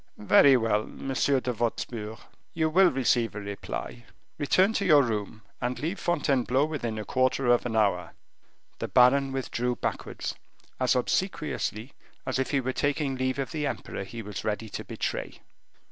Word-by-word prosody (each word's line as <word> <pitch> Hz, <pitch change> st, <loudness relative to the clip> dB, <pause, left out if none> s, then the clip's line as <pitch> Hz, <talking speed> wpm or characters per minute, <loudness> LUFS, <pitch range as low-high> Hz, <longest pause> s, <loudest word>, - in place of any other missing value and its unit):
"Very 130 Hz, +6 st, +6 dB
well, 110 Hz, -2 st, 0 dB
Monsieur 135 Hz, 0 st, 0 dB
de 125 Hz, -1 st, -2 dB
Wostpur, 110 Hz, -1 st, -3 dB, 0.4 s
you 160 Hz, -1 st, +1 dB
will 185 Hz, +2 st, +6 dB
receive 120 Hz, -4 st, +1 dB
a -, -, -3 dB
reply; 100 Hz, -11 st, -6 dB, 0.4 s
return 185 Hz, +8 st, +3 dB
to 200 Hz, -, 0 dB
your 150 Hz, -7 st, +6 dB
room, 110 Hz, -2 st, -3 dB, 0.2 s
and 125 Hz, 0 st, -1 dB
leave 165 Hz, +9 st, -3 dB
Fontainebleau 140 Hz, -5 st, +1 dB
within 125 Hz, -8 st, -3 dB
a 105 Hz, -, -4 dB
quarter 130 Hz, +1 st, +1 dB
of 120 Hz, 0 st, +3 dB
an 110 Hz, -, -4 dB
hour." 90 Hz, -6 st, +1 dB, 0.7 s
The -, -, -2 dB
baron 135 Hz, +2 st, +4 dB
withdrew 125 Hz, -2 st, -2 dB
backwards, -, -, -4 dB, 0.5 s
as 130 Hz, 0 st, +2 dB
obsequiously 130 Hz, -, -1 dB, 0.3 s
as -, -, -1 dB
if 130 Hz, -, 0 dB
he 140 Hz, -, +2 dB
were 130 Hz, 0 st, -2 dB
taking 145 Hz, -1 st, 0 dB
leave 130 Hz, 0 st, -1 dB
of 135 Hz, -1 st, -3 dB
the 150 Hz, -3 st, -1 dB
emperor 120 Hz, -, -4 dB
he 115 Hz, +4 st, -8 dB
was 105 Hz, -1 st, -6 dB
ready 110 Hz, +1 st, -2 dB
to -, -, -5 dB
betray. -, -, -4 dB
125 Hz, 160 wpm, -27 LUFS, 110-140 Hz, 0.7 s, Very